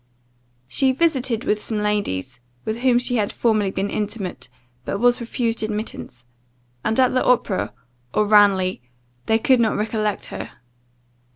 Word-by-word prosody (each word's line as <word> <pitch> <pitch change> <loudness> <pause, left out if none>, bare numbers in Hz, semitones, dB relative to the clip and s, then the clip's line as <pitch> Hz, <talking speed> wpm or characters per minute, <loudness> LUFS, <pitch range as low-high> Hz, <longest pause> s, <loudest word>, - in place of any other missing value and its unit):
She 265 - +2
visited 260 -6 0
some 220 0 -1
ladies 130 - -2 0.3
with 220 +1 -2
whom 250 -1 +3
she 245 0 +1
had 205 -2 0
formerly 215 -4 +1
been 195 +1 -2
intimate, 205 - -4 0.3
but - - -3
was 245 +2 +3
refused 235 0 -2
admittance; 210 - -5 0.6
and 220 +3 0
at 255 -1 +4
the 255 - +2
opera, 240 -6 +1 0.4
or 215 - +2
Ranelagh, 200 -3 +4 0.5
they 220 - +4
could 255 +2 +3
not 225 -2 +2
recollect 215 -1 -1
her. - - -6
220 Hz, 135 wpm, -22 LUFS, 205-245 Hz, 0.6 s, at